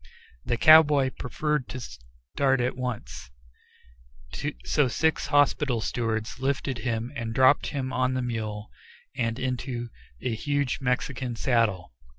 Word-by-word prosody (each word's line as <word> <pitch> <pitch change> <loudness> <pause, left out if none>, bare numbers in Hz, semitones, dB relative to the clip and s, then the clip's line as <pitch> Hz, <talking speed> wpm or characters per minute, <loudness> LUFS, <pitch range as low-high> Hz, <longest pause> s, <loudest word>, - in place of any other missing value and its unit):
The 120 - -1
cowboy 150 -3 +6
preferred 150 +2 -2
to 130 - -5
start 65 - -2
at 125 +1 0
once, 120 - -5 1.4
so 145 -3 +2
six 160 +6 0
hospital 145 -3 +2
stewards 110 0 -2
lifted 135 -1 -1
him 115 +1 -2
and 115 -3 -4
dropped 130 +2 +4
him 130 -3 -3
on 130 0 +1
the 130 - -1
mule, 110 -3 -4 0.4
and 115 -1 -1
into 125 -2 -3 0.3
a 120 - -2
huge 145 +3 -1
Mexican 125 -1 -2
saddle. 110 - 0
125 Hz, 125 wpm, -26 LUFS, 115-135 Hz, 1.4 s, cowboy